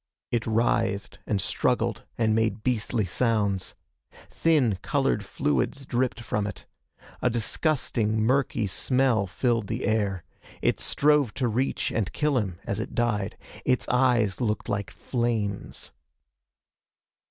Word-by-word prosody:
It 115 -1 0
writhed 115 -2 0
and 105 - +1
struggled - - 0
and 110 -2 +2
made 110 -1 0
beastly 115 -3 0
sounds. 100 -1 0 0.6
Thin, 135 - +2
colored 135 -7 +1
fluids 140 +4 -1
dripped 125 -1 -1
from 105 -2 -1
it. 105 - -8 0.6
A 125 - +3
disgusting 115 -2 0
musky 125 -3 +2
smell 120 +1 +2
filled 115 +2 0
the 115 +4 -2
air. 100 -5 0 0.4
It - - +1
strove 145 -5 +2
to 130 - 0
reach 125 +4 0
and 105 -4 -1
kill 150 -3 +2
him 95 -6 -3
as - - -2
it - - -5
died. 110 -5 0 0.3
Its 125 - +1
eyes 120 -6 +2
looked 110 -3 -1
like 100 -1 -2
flames. 115 -5 -3
115 Hz, 125 wpm, -26 LUFS, 105-125 Hz, 0.6 s, A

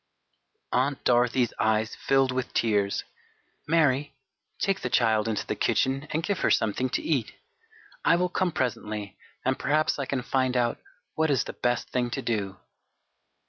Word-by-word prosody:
Aunt 135 +2 0
Dorothy's 120 0 +2
eyes 110 0 +1
filled 135 -1 +2
with 130 0 -3
tears. 105 -3 +1 0.6
"Mary, 145 -3 +2 0.4
take 195 -1 0
the 125 - -3
child 110 -3 +2
into 110 -2 -1
the - - -2
kitchen 135 +3 0
and 155 +2 -1
give 200 0 -1
her - - +2
something 110 +4 +1
to - - -2
eat. 135 -9 0 0.7
I - - +5
will 180 +1 +1
come 185 0 0
presently 105 -7 -3 0.3
and 130 0 +1
perhaps 150 +1 +1
I 140 - -2
can 130 -3 -2
find 130 -1 +1
out 120 -1 +1 0.3
what 160 0 +1
is 140 -3 +2
the - - -7
best 120 0 -1
thing 125 -1 0
to - - -2
do." 100 -4 -2
130 Hz, 160 wpm, -27 LUFS, 115-140 Hz, 0.7 s, I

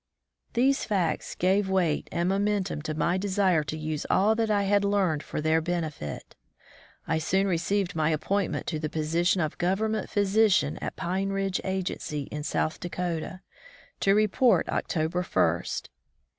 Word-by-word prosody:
These 265 +3 +2
facts 180 -7 -1
gave 190 +2 +2
weight 180 -5 +1
and 170 +1 0
momentum 195 -3 0
to 155 0 -4
my 175 +4 +1
desire 185 -4 +2
to 155 - -4
use 155 -1 -3
all 205 +4 +4
that 225 0 0
I 205 -1 +2
had 200 +1 +2
learned 195 -7 +1
for - - -5
their 160 +1 +2
benefit. 160 - -4 0.7
I 160 - +1
soon 190 +5 +1
received 195 +2 0
my 155 -1 +2
appointment 190 +5 -1
to 155 - -2
the 155 0 -3
position 165 +4 +1
of 155 -1 -3
Government 210 +5 0
physician 200 -6 +2
at - - -4
Pine 190 +3 -2
Ridge 195 -1 -1
agency 185 -6 -3
in 150 - -4
South 155 +1 -1
Dakota, 175 0 -4 0.6
to 195 0 +3
report 215 +4 +3
October 165 +2 -1
first. 180 - 0
185 Hz, 150 wpm, -27 LUFS, 160-200 Hz, 0.7 s, all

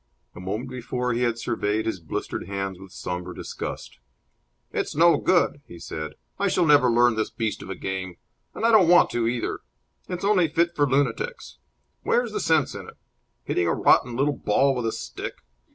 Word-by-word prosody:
A - - -11
moment 105 +8 -4
before 125 0 -2
he 120 - -1
had 120 -2 +1
surveyed 110 -2 -1
his 110 -4 -2
blistered 85 +1 -5
hands 95 -1 -4
with 95 -1 -12
sombre 90 0 -5
disgust. - - -7 0.7
"It's - - -2
no 170 +2 +6
good," 175 -5 +2
he 85 - -11
said. 80 -2 -6 0.3
"I - - +2
shall 180 - +2
never 145 -4 +5
learn 120 0 +4
this 110 0 -1
beast 110 -2 -3
of - - -9
a 95 - -4
game. 95 -2 -5 0.4
And - - -2
I 230 - +5
don't 200 -7 +6
want 175 0 +6
to 115 -1 0
either. 120 0 -2 0.5
It's 180 +1 -3
only 195 -5 +4
fit 170 +2 +1
for 145 -3 +2
lunatics. 145 - -1 0.4
Where's 240 -2 +1
the 210 - -2
sense 160 -6 +2
in - - -8
it? - - -16 0.5
Hitting 85 - 0
a 80 - +1
rotten 120 -1 +3
little 140 +3 +1
ball 135 +4 +2
with 120 -2 -1
a - - 0
stick! 115 0 -6
120 Hz, 190 wpm, -25 LUFS, 100-160 Hz, 0.7 s, no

